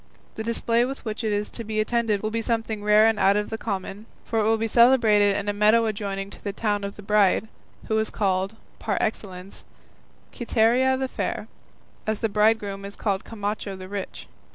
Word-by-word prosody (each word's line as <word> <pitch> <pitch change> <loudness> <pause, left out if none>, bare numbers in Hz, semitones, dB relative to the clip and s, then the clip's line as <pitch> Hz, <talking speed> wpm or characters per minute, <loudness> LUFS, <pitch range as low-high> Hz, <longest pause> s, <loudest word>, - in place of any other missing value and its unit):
The 220 - -5
display 230 +1 +1
with 270 +1 -5
which 220 +1 -4
it 220 - 0
is 205 0 -1
to 230 - -6
be 215 0 -3
attended 215 -2 0
will 215 - -1
be 230 +1 -1
something 225 -2 -2
rare 210 +1 +5
and 225 -1 +2
out 200 +1 +4
of 210 - -2
the 225 - -2
common, 195 +2 -5 0.2
for 225 - -1
it - - +2
will 225 +1 +3
be 225 +1 -1
celebrated 220 -4 +5
in 205 0 -4
a 205 - +1
meadow 215 +3 +4
adjoining 200 -2 -3
the 200 - -2
town 205 0 -1
of 200 0 -5
the 210 - -11
bride, 210 +1 +3 0.4
who 220 0 +1
is 220 - -1
called, 195 0 -1 0.2
par 210 -3 -1
excellence, 195 -3 -4 0.7
Quiteria 245 +3 +2
the 265 0 -1
fair, - - -4 0.6
as 215 0 0
the 225 - -1
bridegroom 210 -1 +1
is 200 0 -8
called 195 -3 -1
Camacho 205 -2 -4
the 185 0 -9
rich. 200 0 -6
215 Hz, 200 wpm, -24 LUFS, 200-225 Hz, 0.7 s, rare